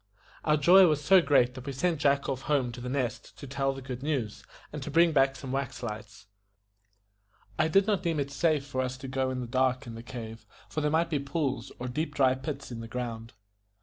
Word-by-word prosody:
Our 150 Hz, 0 st, +3 dB
joy 180 Hz, +5 st, +7 dB
was 150 Hz, -2 st, +1 dB
so 190 Hz, +5 st, +6 dB
great 125 Hz, -6 st, +3 dB
that 130 Hz, +1 st, -10 dB
we 140 Hz, -, -3 dB
sent 165 Hz, +3 st, 0 dB
Jack 140 Hz, -1 st, +2 dB
off 130 Hz, -2 st, -2 dB
home 135 Hz, -5 st, +2 dB
to 120 Hz, +1 st, -9 dB
The 125 Hz, -, -5 dB
Nest 130 Hz, -3 st, -3 dB
to -, -, -9 dB
tell 135 Hz, 0 st, -1 dB
the 135 Hz, -1 st, -8 dB
good 130 Hz, -1 st, -6 dB
news, 135 Hz, -8 st, -2 dB, 0.3 s
and 150 Hz, -, -5 dB
to 135 Hz, -, -5 dB
bring 165 Hz, +3 st, +4 dB
back 135 Hz, -2 st, +3 dB
some 130 Hz, -2 st, -7 dB
wax 135 Hz, -2 st, -3 dB
lights. 110 Hz, -1 st, -7 dB, 1.3 s
I 155 Hz, -, +4 dB
did 195 Hz, +4 st, +4 dB
not 205 Hz, -3 st, +1 dB
deem 165 Hz, -4 st, -1 dB
it 140 Hz, 0 st, -2 dB
safe 150 Hz, 0 st, +1 dB
for 130 Hz, -2 st, -2 dB
us 130 Hz, 0 st, -3 dB
to 135 Hz, +1 st, -8 dB
go 130 Hz, 0 st, -1 dB
in 130 Hz, -1 st, -3 dB
the -, -, -4 dB
cave 130 Hz, +2 st, 0 dB, 0.2 s
in 115 Hz, -, -8 dB
the 115 Hz, -, -8 dB
dark, 115 Hz, -2 st, -8 dB, 0.3 s
for 155 Hz, -, -2 dB
there 150 Hz, -, +1 dB
might 165 Hz, +2 st, +1 dB
be 150 Hz, -, +1 dB
pools 140 Hz, -1 st, -2 dB
or 125 Hz, -, -5 dB
deep 150 Hz, +4 st, -3 dB
dry 130 Hz, -2 st, +4 dB
pits 135 Hz, 0 st, -6 dB
in 115 Hz, -, -6 dB
the 115 Hz, -, -7 dB
ground. 115 Hz, -1 st, -5 dB
135 Hz, 235 wpm, -29 LUFS, 125-150 Hz, 1.3 s, joy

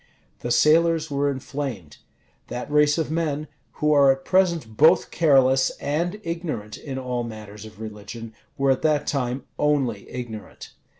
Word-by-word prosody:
The 120 Hz, -, -4 dB
sailors 160 Hz, +4 st, +3 dB
were 140 Hz, 0 st, +1 dB
inflamed. 130 Hz, -, -5 dB, 0.5 s
That 125 Hz, +4 st, -6 dB
race 150 Hz, 0 st, +4 dB
of 160 Hz, -2 st, -1 dB
men, 155 Hz, -2 st, -1 dB, 0.3 s
who 150 Hz, 0 st, +1 dB
are 140 Hz, -2 st, +6 dB
at 135 Hz, 0 st, -3 dB
present 170 Hz, -11 st, +1 dB
both 160 Hz, +7 st, +5 dB
careless 135 Hz, -4 st, +4 dB
and 170 Hz, +8 st, -2 dB
ignorant 165 Hz, -, -4 dB
in 135 Hz, -3 st, -7 dB
all 125 Hz, -2 st, -2 dB
matters 110 Hz, -2 st, -9 dB
of 110 Hz, -2 st, -13 dB
religion, 110 Hz, +1 st, -8 dB, 0.2 s
were 135 Hz, 0 st, +3 dB
at 130 Hz, -, 0 dB
that 150 Hz, -2 st, +2 dB
time 130 Hz, -2 st, -2 dB, 0.2 s
only 135 Hz, -8 st, 0 dB
ignorant. 115 Hz, -4 st, -8 dB
140 Hz, 145 wpm, -24 LUFS, 120-155 Hz, 0.5 s, are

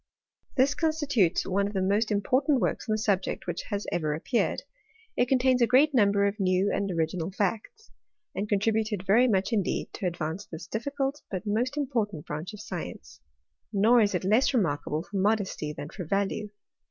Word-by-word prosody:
This 270 Hz, +2 st, +3 dB
constitutes 290 Hz, -, +1 dB
one 200 Hz, +1 st, +1 dB
of 205 Hz, -, -6 dB
the 190 Hz, -, 0 dB
most 205 Hz, +4 st, +1 dB
important 255 Hz, +7 st, +2 dB
works -, -, -2 dB
on -, -, +3 dB
the -, -, +1 dB
subject 200 Hz, -4 st, -1 dB
which 175 Hz, -1 st, -3 dB
hat 205 Hz, 0 st, -2 dB
ever 155 Hz, -3 st, 0 dB
appeared. 230 Hz, +10 st, -1 dB, 0.5 s
It 245 Hz, -, +2 dB
contains 255 Hz, 0 st, +3 dB
a 235 Hz, -, +5 dB
great 280 Hz, +5 st, +4 dB
number 200 Hz, -4 st, +4 dB
of 200 Hz, +2 st, -1 dB
new 185 Hz, +1 st, +2 dB
and 200 Hz, 0 st, -1 dB
original 165 Hz, 0 st, -1 dB
facts; 215 Hz, -, -3 dB, 0.4 s
and 205 Hz, +2 st, -3 dB
contributed 210 Hz, -1 st, 0 dB
very 230 Hz, +6 st, +5 dB
much 200 Hz, 0 st, +1 dB
indeed 200 Hz, -5 st, -1 dB
to 195 Hz, -, -2 dB
advance 170 Hz, +2 st, -4 dB
this 160 Hz, 0 st, -8 dB
difficult, 275 Hz, +7 st, -3 dB
but 190 Hz, +1 st, -4 dB
most 240 Hz, +7 st, -1 dB
important 225 Hz, -, -2 dB
branch 155 Hz, +6 st, -5 dB
of 210 Hz, -1 st, -9 dB
science: 230 Hz, -, -7 dB, 0.5 s
nor 225 Hz, +4 st, +5 dB
is 205 Hz, -3 st, +2 dB
it 180 Hz, -, -1 dB
less 225 Hz, +8 st, +3 dB
remarkable 155 Hz, -6 st, 0 dB
for 200 Hz, +2 st, -6 dB
modesty 195 Hz, -6 st, 0 dB
than 150 Hz, 0 st, -7 dB
for 190 Hz, -, -6 dB
value. 200 Hz, +4 st, -1 dB
205 Hz, 175 wpm, -27 LUFS, 185-240 Hz, 0.5 s, a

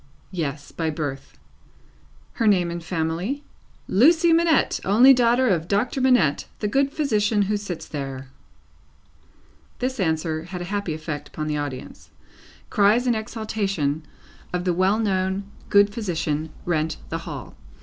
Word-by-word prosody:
Yes. 150 Hz, -5 st, -4 dB
By 160 Hz, -1 st, -2 dB
birth. 145 Hz, -3 st, -5 dB, 1.0 s
Her 230 Hz, -, 0 dB
name 180 Hz, -4 st, +3 dB
and 170 Hz, 0 st, -5 dB
family? 170 Hz, -, -2 dB, 0.4 s
"Lucie 325 Hz, -, +5 dB
Manette, 330 Hz, -2 st, +3 dB
only 240 Hz, +8 st, +7 dB
daughter 245 Hz, +1 st, +3 dB
of 170 Hz, -6 st, +1 dB
Doctor 235 Hz, +7 st, 0 dB
Manette, 245 Hz, -, +3 dB
the 210 Hz, -, -2 dB
good 275 Hz, +6 st, +1 dB
physician 215 Hz, -8 st, +1 dB
who 210 Hz, +2 st, 0 dB
sits 180 Hz, -6 st, -5 dB
there." 135 Hz, -3 st, -6 dB, 1.5 s
This 255 Hz, 0 st, -2 dB
answer 160 Hz, -2 st, -1 dB
had 180 Hz, +1 st, -6 dB
a -, -, -4 dB
happy 200 Hz, -6 st, -1 dB
effect 155 Hz, -2 st, -5 dB
upon 155 Hz, -, -5 dB
the 150 Hz, -1 st, -1 dB
audience. 145 Hz, -3 st, -6 dB, 0.6 s
Cries 210 Hz, +5 st, +4 dB
in 245 Hz, -, +3 dB
exaltation 205 Hz, -9 st, -2 dB, 0.5 s
of 180 Hz, 0 st, -2 dB
the 180 Hz, -1 st, +1 dB
well 190 Hz, +4 st, +2 dB
known 190 Hz, -2 st, 0 dB, 0.3 s
good 205 Hz, 0 st, +5 dB
physician 165 Hz, -7 st, -2 dB, 0.2 s
rent 160 Hz, -2 st, 0 dB
the -, -, -3 dB
hall. -, -, -8 dB
190 Hz, 140 wpm, -23 LUFS, 160-225 Hz, 1.5 s, only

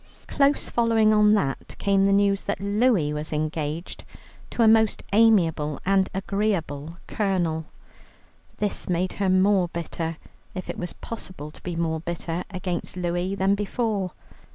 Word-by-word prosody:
Close 280 Hz, 0 st, +2 dB
following 225 Hz, -2 st, +3 dB
on 210 Hz, 0 st, +5 dB
that 140 Hz, -9 st, -2 dB
came 195 Hz, -1 st, +2 dB
the 200 Hz, -, +3 dB
news 200 Hz, 0 st, +2 dB
that 200 Hz, -, -2 dB
Louie 200 Hz, -6 st, +2 dB
was 150 Hz, +1 st, -4 dB
engaged 155 Hz, +1 st, -3 dB, 0.5 s
to 235 Hz, -, +1 dB
a -, -, +6 dB
most 220 Hz, -1 st, +4 dB
amiable 170 Hz, -9 st, +3 dB
and 190 Hz, 0 st, +3 dB
agreeable 180 Hz, -6 st, -2 dB
colonel. 175 Hz, -6 st, -1 dB, 0.9 s
This 205 Hz, -2 st, -3 dB
made 180 Hz, +1 st, 0 dB
her 195 Hz, -, +2 dB
more 185 Hz, 0 st, +4 dB
bitter, 165 Hz, -1 st, -4 dB, 0.4 s
if 185 Hz, -, -4 dB
it -, -, -9 dB
was 180 Hz, -, -4 dB
possible 185 Hz, -9 st, -8 dB
to -, -, -15 dB
be 175 Hz, -1 st, -4 dB
more 160 Hz, -1 st, -1 dB
bitter, 170 Hz, +1 st, -4 dB
against 180 Hz, -2 st, -4 dB
Louie 175 Hz, +2 st, -1 dB
than 195 Hz, 0 st, +2 dB
before. 205 Hz, -2 st, -1 dB
185 Hz, 145 wpm, -25 LUFS, 165-205 Hz, 0.9 s, a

